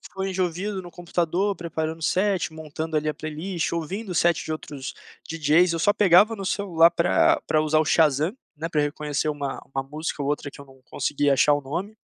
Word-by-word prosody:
fone 195 0 -3
de 185 0 0
ouvido 185 +3 -3
no 175 - -10
computador, 175 +3 -1
preparando 160 -2 -4
o - - -10
set, 185 -2 +1
montando, 160 0 -5
ali, 155 0 0
a 150 - -1
playlist, 160 +3 -3
ouvindo 185 +6 -4
o - - -3
set 170 -1 +2
de - - -7
outros 145 -3 -6 0.3
DJs, 165 +2 +3
eu - - -2
só 205 +5 +3
pegava 205 +3 +5
no 195 -2 -6
celular 175 -4 +3
pra 170 0 +3
pra 155 - +2
usar 155 0 +2
o 155 - +3
Shazam, 155 - +2 0.2
né, 160 +2 -4
pra 155 -3 0
reconhecer 150 +1 -2
uma 145 -2 -3
uma 135 - -1
música 155 +2 -5
ou 140 - -2
outra 145 -1 -2
que 140 - -14
eu - - -10
não 135 -1 -19
conseguia 145 -1 +1
achar 145 +3 +4
o 145 - +2
nome. 180 +10 -5
160 Hz, 215 wpm, -24 LUFS, 150-180 Hz, 0.3 s, pegava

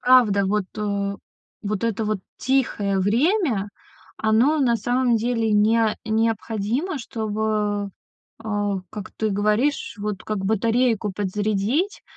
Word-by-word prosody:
правда, 240 -6 +5
вот, 210 0 +1
э, 200 -1 -1 0.5
вот 210 +1 -2
это 225 -1 -1
вот 215 -1 -1 0.2
тихое 215 -7 +1
время, 235 - +1 0.5
оно 230 +8 +3
на 235 -3 +3
самом 245 0 +1
деле 225 -1 0
нео 215 +1 +3
необходимо, 225 - -1
чтобы, 215 -3 -2 0.5
а, 205 -2 -1
как 210 -3 -7
ты 220 -1 0
говоришь, 210 +7 0
вот 205 -2 -4
как 215 -1 -2
батарейку 225 0 +1
подзарядить. 210 - -1
215 Hz, 115 wpm, -23 LUFS, 205-235 Hz, 0.5 s, правда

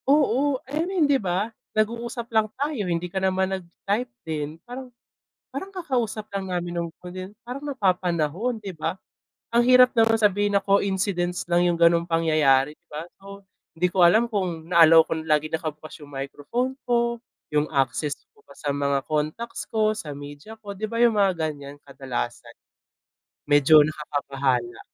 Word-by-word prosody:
Oo, 280 -1 +3
I 290 +4 -2
mean, 365 -5 +2
di 280 -2 +2
ba? 195 +4 -1 0.2
Nag-uusap 235 +2 -2
lang 220 -1 +3
tayo 275 -9 -2
hindi 170 0 -1
ka 190 +2 -3
naman 190 0 +1
nag-type 195 +6 -3 0.2
din, 155 -1 -4
parang 250 +1 -8 0.6
parang 390 +1 -7
kakausap 245 - -2
lang 195 -1 -3
namin 175 -1 -3
no'ng 170 -1 -2
ko 180 - -8
din 185 +2 -8
parang 250 +3 -6
napapanahon, 185 - 0
'di 195 -2 -5
ba? 160 +1 -3 0.6
Ang 235 +1 +4
hirap 250 0 +7
naman 225 0 +5
sabihin 205 -1 +2
na 200 - +4
coincidence 190 -3 0
lang 175 +1 +4
'yung 175 - +2
gano'ng 170 0 +4
pangyayari 155 -4 +3
'di - - -51
ba, 150 +1 -6 0.2
so 200 0 -11 0.3
hindi 180 +2 +1
ko 180 -1 +5
alam 220 +6 +3
kung 175 -6 -3
na 170 - +4
allow 165 0 +8
kong 160 0 -4
laging 155 +1 +1
nakabukas 155 -1 -7
'yung 145 - -17
microphone 145 - -3
ko, 235 -1 +1 0.3
'yung 150 0 +2
access 135 +2 +1 0.2
ko 435 - -28
pa - - -15
sa 145 - -4
mga 140 -1 0
contacts 155 +10 -2
ko, 215 -1 +1
sa 150 -8 -6
media 145 +8 -10
ko, 205 -2 -7
di 215 - -2
ba? 230 +2 -2
'Yung 230 -3 +4
mga 195 -2 +4 0.2
ganiyan 145 -1 -9
kadalasan, 135 - -5 1.0
medyo 145 +1 +7
nakakabahala. 145 - -1
185 Hz, 165 wpm, -24 LUFS, 155-230 Hz, 1.0 s, allow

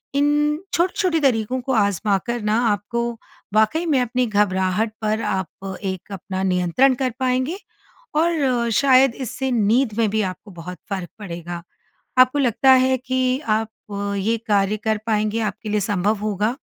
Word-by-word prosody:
इन, 295 +1 +2
छोटे-छोटे 365 -1 +1
तरीकों 250 -1 +1
को 265 - -3
आज़माकर 205 +2 0
ना 215 +2 +2
आपको, 235 +3 -1 0.4
वाक़ई 220 +11 +3
में 280 -5 +3
अपनी 250 +1 0
घबराहट 205 0 +1
पर 215 +1 0
आप 190 +1 -4
एक 190 +1 -5
अपना 190 0 -5
नियंत्रण 185 +8 +3
कर 255 -1 -1
पाएँगे 260 +7 0 0.6
और 330 +1 +2
अ, 245 -3 +1
शायद 265 -2 +5
इससे 260 +1 -3
नींद 230 +1 +2
में 220 -2 +3
भी 215 +1 0
आपको 190 +2 -5
बहुत 180 +1 -8
फ़र्क 190 -4 -4
पड़ेगा। 170 -3 -6 0.6
आपको 255 +3 +5
लगता 260 0 +4
है 260 0 +4
कि 255 +1 0
आप 225 -5 -1 0.5
ये 225 +4 0
कार्य 205 0 +2
कर 220 0 -1
पाएँगे, 215 0 0
आपके 215 0 -4
लिए 210 - +1
सँभव 205 +1 +1
होगा? 215 +3 -1
220 Hz, 150 wpm, -21 LUFS, 200-260 Hz, 0.6 s, शायद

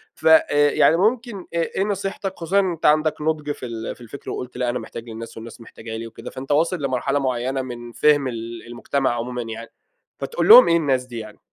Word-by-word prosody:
ف - - -2
آآ، 145 -2 +5
يعني 165 - +4
ممكن 230 +3 0 0.2
آآ - - -2
إيه 170 +3 0
نصيحتك 195 -1 -3
خصوصًا 180 +4 +1
إن 190 -2 +1
انت 165 -1 -5
عندك 155 0 +3
نُضْج 150 -1 -1
في 130 - -6
ال 115 -1 -5
في - - -20
الفِكْر 120 +4 -9
وقُلت 125 0 -6
لأ 125 -1 0
أنا 125 +1 -2
محتاج 115 +1 -9
للناس 115 0 -8
والناس 115 +1 -10
محتاجة 110 0 -8
لي 115 +1 -6
وكده، 115 - -10
فأنت 135 +2 -7
واصل 165 +2 +1
لمرحلة 130 +1 0
معيّنة 130 0 -1
من 120 -2 -8
فِهْم 145 +2 +3
ال 115 -1 -6
المجتمع 120 +2 -1
عمومًا 125 +1 -4
يعني، 115 0 -7 0.5
فتقول 470 - -2
لهم 485 +3 +11
إيه 170 - +4
الناس 135 -5 0
دي 120 -2 -7
يعني؟ 110 -1 -10
130 Hz, 215 wpm, -22 LUFS, 120-160 Hz, 0.5 s, لهم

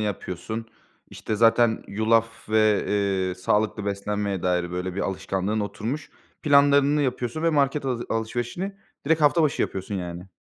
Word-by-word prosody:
yapıyorsun. 105 +2 -4 0.4
İşte 110 - -4
zaten 115 +1 +3
yulaf 115 +2 0
ve, 110 -1 +3
eee, 95 -3 0
sağlıklı 105 +3 0
beslenmeye 100 -1 -2
dair 90 -1 0
böyle 90 0 -3
bir 100 - -2
alışkanlığın 95 +2 -2
oturmuş. 110 +9 -4 0.3
Planlarını 145 0 +4
yapıyorsun 125 +2 -2
ve 165 - +3
market 145 -1 +1
hazı 125 -3 -2
alışverişini 120 - -3 0.3
direkt 160 +1 +3
hafta 155 +2 +4
başı 150 - +1
yapıyorsun 95 +2 -4
yani. 90 -1 -5
110 Hz, 140 wpm, -25 LUFS, 100-135 Hz, 0.4 s, Planlarını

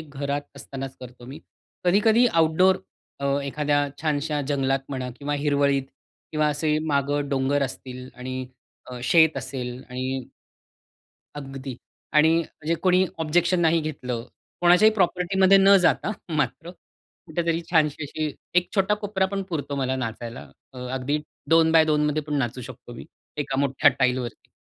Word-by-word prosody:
घरात 145 -1 -4
असतानाच 135 -1 -7
करतो 125 -1 -11
मी. 140 +5 -9 0.4
कधी-कधी 215 +6 +4
आउटडोर 165 +3 +4 0.4
अ, - - -3 0.2
एखाद्या 145 0 0 0.2
छानशा 150 -1 0
जंगलात 135 -2 +1
म्हणा 130 -2 -4
किंवा 145 0 -2
हिरवळीत 140 -1 +2 0.5
किंवा 155 -1 +2
असे 150 +1 0
मागं 145 0 0
डोंगर 140 +1 +1
असतील 130 -1 -6
आणि 130 +1 -5 0.4
अ, 125 - -6
शेत 160 +3 +4
असेल 130 -2 -5
आणि 130 +1 -3 1.1
अगदी 135 -2 -7 0.4
आणि 160 +2 +6
म्हणजे 165 0 -3
कोणी 185 0 +4
ऑब्जेक्शन 170 +3 +2
नाही 165 0 +3
घेतलं. 125 -6 -4 0.4
कोणाच्याही 180 +5 +6
प्रॉपर्टीमध्ये 190 0 +3
न 195 +1 +7
जाता 185 - +2 0.3
मात्र, 160 +3 -2
कुठेतरी 170 -2 -5
छानशी 155 -3 +2
अशी 155 +1 -3 0.3
एक 180 - -2
छोटा 195 0 +3
कोपरा 205 -2 -1
पण 195 +1 -3
पुरतो 145 -5 -3
मला 130 -1 -1
नाचायला. 115 -1 -5 0.3
अ, 130 - -10
अगदी 130 +3 -1 0.3
2x2मध्ये 160 -2 +4
मध्ये 150 +1 0
पण 150 0 -4
नाचू 125 -1 -2
शकतो 120 0 -10
मी, - - -9 0.3
एका 140 -2 -2
मोठ्या 140 -1 +4
टाइलवरती. 125 -2 -1
145 Hz, 135 wpm, -24 LUFS, 135-165 Hz, 1.1 s, न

